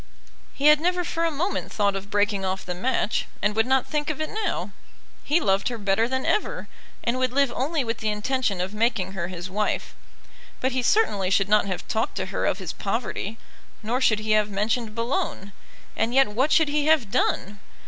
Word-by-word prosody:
He 280 - -2
had 300 0 +8
never 360 +1 +1
for 335 -1 -1
a - - +2
moment 325 +6 -2
thought 200 -2 +1
of 195 +1 -6
breaking 205 -1 +1
off 190 0 -2
the 180 - -3
match, 220 +3 0
and 205 +1 0
would 225 +2 +2
not 265 0 +3
think 300 0 -2
of 310 -1 -3
it 310 - -3
now. 435 +1 -2 0.5
He 305 +4 +2
loved 195 - +1
her 240 - -3
better 205 +2 +1
than 260 +1 -2
ever, - - 0 0.4
and 240 +2 0
would 255 -1 +1
live 275 -1 +2
only 295 +2 0
with 230 -1 -3
the 215 - -1
intention 210 -2 -1
of 185 +3 -3
making 215 -4 0
her 175 -3 -3
his 175 -1 -6
wife. 210 +3 -2 0.7
But 260 - 0
he 260 0 0
certainly 235 - +2
should 195 0 +2
not 210 -1 +4
have 185 -2 -4
talked 220 +1 -1
to 190 -1 -2
her - - 0
of - - +1
his 185 -5 -5
poverty, 215 0 -3 0.5
nor 240 +5 -1
should 220 -4 +4
he 215 0 -2
have 215 -1 +3
mentioned 215 +2 -1
Boulogne. 230 - -2 0.4
And 235 +3 0
yet 270 -4 +5
what 255 +8 +1
should 320 -3 +4
he 295 0 +1
have 295 -10 +3
done? 205 -4 0
225 Hz, 210 wpm, -25 LUFS, 200-270 Hz, 0.7 s, had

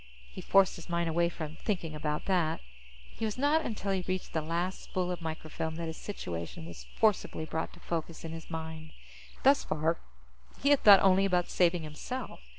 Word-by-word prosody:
_ - - -21 0.3
He - - -7
forced 195 -1 +4
his 170 - -11
mind 170 0 0
away 170 +1 +2
from 160 -2 -6
thinking 175 -7 -2
about 150 0 -2
that. 175 -5 +1 0.6
It - - -3
was 215 +1 -2
not 290 +4 +3
until 205 -5 -2
he 190 -2 0
reached 185 0 -3
the 160 - +1
last 170 +4 -2
spool 180 -1 -2
of 180 - -4
microfilm 160 0 -4
that 170 0 -4
his 160 0 -4
situation 90 - -5
was - - -10
forcibly 210 -7 +1
brought 160 0 -3
to 175 - -14
focus 165 -1 -4
in 160 - -5
his 165 0 -8
mind. 160 -1 -6 0.5
Thus 275 +1 +6
far, 160 +2 0 0.7
he 280 - +4
had 285 - +4
thought 200 -2 +9
only 195 0 +5
about 180 -2 +1
saving 175 -2 +3
himself. 155 +12 -6
170 Hz, 195 wpm, -31 LUFS, 160-190 Hz, 0.7 s, thought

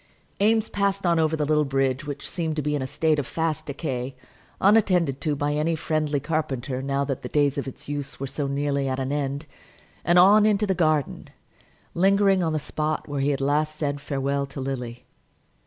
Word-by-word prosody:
Eames 220 +1 +3
passed 200 -1 -1
on 170 -1 +3
over 160 0 +2
the 150 - 0
little 150 0 +3
bridge, 135 0 0
which 145 -1 -5
seemed 165 -3 -2
to 150 - -2
be 150 +1 0
in 145 - -2
a 130 - -2
state 155 +2 +1
of 140 - -3
fast 160 -2 -2
decay, 135 -3 -4 0.4
unattended 185 -9 +3
to 150 -2 0
by 145 +1 -1
any 155 +3 +1
friendly 155 -2 -1
carpenter, 135 -4 -2
now 140 +1 -1
that 135 -2 -3
the 125 - -6
days 145 -2 +2
of 140 - -3
its 135 - -9
use 145 -1 -4
were 135 - -3
so 140 +1 -3
nearly 140 0 -1
at 130 0 -2
an 135 +1 -2
end; 140 +1 -2 0.6
and 175 +1 +3
on 200 +4 +7
into 210 -1 +3
the 195 - +1
garden, 155 -5 0 0.6
lingering 195 +1 +3
on 165 -2 0
the - - +1
spot 155 +1 -3
where 145 -2 -2
he 140 - +2
had 140 -1 -1
last 150 +2 +1
said 145 -2 -2
farewell 140 -1 -1
to 140 - -8
Lily. 125 -3 -5
145 Hz, 205 wpm, -25 LUFS, 135-160 Hz, 0.6 s, on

